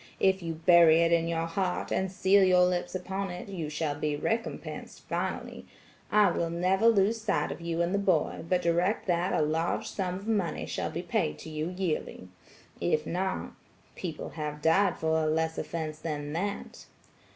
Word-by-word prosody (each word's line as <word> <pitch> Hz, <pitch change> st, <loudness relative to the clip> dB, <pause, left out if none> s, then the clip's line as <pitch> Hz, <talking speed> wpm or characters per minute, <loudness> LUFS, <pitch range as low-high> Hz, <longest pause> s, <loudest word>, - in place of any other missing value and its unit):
If 190 Hz, 0 st, +3 dB
you 165 Hz, -1 st, -4 dB
bury 170 Hz, 0 st, +6 dB
it 165 Hz, 0 st, +3 dB
in 165 Hz, -1 st, +3 dB
your 165 Hz, 0 st, -1 dB
heart, 180 Hz, +2 st, -2 dB
and 190 Hz, -1 st, 0 dB
seal 190 Hz, +1 st, +4 dB
your 180 Hz, -1 st, +5 dB
lips 180 Hz, 0 st, -1 dB
upon 190 Hz, +1 st, -3 dB
it, 180 Hz, +3 st, -7 dB
you 170 Hz, -6 st, -4 dB
shall 150 Hz, -1 st, -1 dB
be 150 Hz, 0 st, -2 dB
recompensed 225 Hz, +9 st, -4 dB
finally, -, -, -4 dB, 0.4 s
I 210 Hz, -3 st, +5 dB
will 170 Hz, 0 st, -1 dB
never 185 Hz, +6 st, +2 dB
lose 220 Hz, 0 st, +3 dB
sight 215 Hz, -2 st, 0 dB
of -, -, -7 dB
you 170 Hz, 0 st, -1 dB
and 175 Hz, +2 st, -1 dB
the 200 Hz, -, +2 dB
boy, 185 Hz, -6 st, +1 dB
but 180 Hz, -1 st, +2 dB
direct 175 Hz, +5 st, +1 dB
that 175 Hz, 0 st, +1 dB
a -, -, +2 dB
large 160 Hz, +3 st, -1 dB
sum 190 Hz, 0 st, -2 dB
shall -, -, -3 dB
be -, -, -5 dB
paid 75 Hz, 0 st, -1 dB
to 160 Hz, -, -9 dB
you 155 Hz, +2 st, -2 dB
yearly. 180 Hz, -, -3 dB, 0.5 s
If 150 Hz, -, +1 dB
not–people 180 Hz, -1 st, -5 dB
have 150 Hz, -1 st, -5 dB
died 190 Hz, +5 st, +3 dB
for 160 Hz, 0 st, +1 dB
a -, -, +1 dB
less 160 Hz, +1 st, 0 dB
offense 155 Hz, -2 st, -4 dB
than 150 Hz, -2 st, -4 dB
that.' 200 Hz, +5 st, -4 dB
170 Hz, 175 wpm, -29 LUFS, 160-190 Hz, 0.5 s, bury